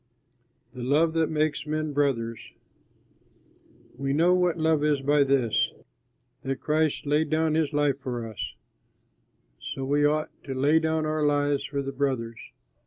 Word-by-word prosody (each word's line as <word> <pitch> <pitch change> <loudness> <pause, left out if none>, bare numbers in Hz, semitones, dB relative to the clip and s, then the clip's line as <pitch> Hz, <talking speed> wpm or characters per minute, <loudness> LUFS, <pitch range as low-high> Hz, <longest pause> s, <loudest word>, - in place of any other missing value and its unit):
THE 125 - -8
LOVE 150 +6 +2
THAT 165 -1 +1
MAKES 155 -1 -1
MEN 155 0 -2
BROTHERS 115 -6 -1 1.5
We 135 0 -1
know 170 +5 +4
what 180 -2 +2
love 160 -2 +2
is 150 -2 +2
by 145 +1 +3
this, 135 -5 +1 0.7
that 135 0 -2
Christ 155 -1 0
laid 150 +2 +1
down 160 0 +1
his 155 -2 +1
life 145 -2 +1
for 120 -4 -4
us; 110 - -6 1.0
so 135 - -5
we 145 +2 +2
ought 155 +1 +1
to 135 - -4
lay 145 +5 +3
down 160 -1 0
our 155 0 -1
lives 145 -1 +1
for 140 0 -3
the 135 - -4
brothers. 130 -5 -2
145 Hz, 150 wpm, -26 LUFS, 135-155 Hz, 1.5 s, know